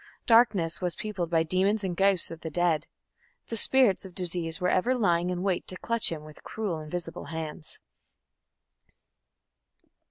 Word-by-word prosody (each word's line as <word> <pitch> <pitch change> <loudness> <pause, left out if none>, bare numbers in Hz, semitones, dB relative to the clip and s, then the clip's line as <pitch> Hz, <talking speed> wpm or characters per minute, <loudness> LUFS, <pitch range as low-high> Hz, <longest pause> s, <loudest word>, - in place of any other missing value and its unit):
Darkness 200 -9 +3
was 180 -1 -1
peopled 195 -6 -4
by 165 -1 +2
demons 190 +5 +1
and 185 -2 -2
ghosts 195 -1 +3
of 165 0 -9
the 160 - -5
dead. 170 -1 0 0.6
The 230 - -3
spirits 235 -3 +4
of 185 -3 -11
disease 175 -2 +2
were 180 - 0
ever 210 +8 +2
lying 175 -6 +1
in 180 0 -3
wait 190 -3 -1
to 185 - -6
clutch 230 -1 +1
him 155 -2 -5
with 155 0 -14
cruel 205 -7 -4
invisible 165 +2 -6
hands. 160 -1 -6
180 Hz, 155 wpm, -27 LUFS, 165-200 Hz, 0.6 s, spirits